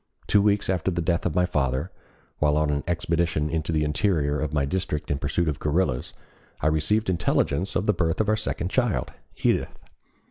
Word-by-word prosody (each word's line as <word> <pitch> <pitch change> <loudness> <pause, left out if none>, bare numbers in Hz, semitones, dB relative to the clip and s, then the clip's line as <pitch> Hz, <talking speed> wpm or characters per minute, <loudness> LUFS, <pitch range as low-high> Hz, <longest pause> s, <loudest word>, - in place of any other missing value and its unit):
Two 100 - +4
weeks 105 0 +2
after 95 -1 0
the 85 -2 -2
death 85 +1 0
of 85 - -4
my 90 0 +3
father, 70 0 -1 0.5
while 75 0 +3
on 75 -1 +2
an 70 0 -1
expedition 85 -3 0
into 80 0 -1
the 80 -1 +1
interior 75 -2 +1
of 75 -2 -2
my 75 -2 +1
district 75 -2 -2
in 70 - 0
pursuit 80 +4 0
of 75 -3 -1
guerrillas, 75 -4 0 0.5
I - - -4
received 105 +8 +1
intelligence 90 0 0
of 95 - +1
the 105 - +3
birth 80 -4 0
of 110 - +1
our 110 - +3
second 95 -4 -3
child, 120 -2 0 0.3
Edith. - - +1
85 Hz, 190 wpm, -25 LUFS, 75-95 Hz, 0.5 s, Two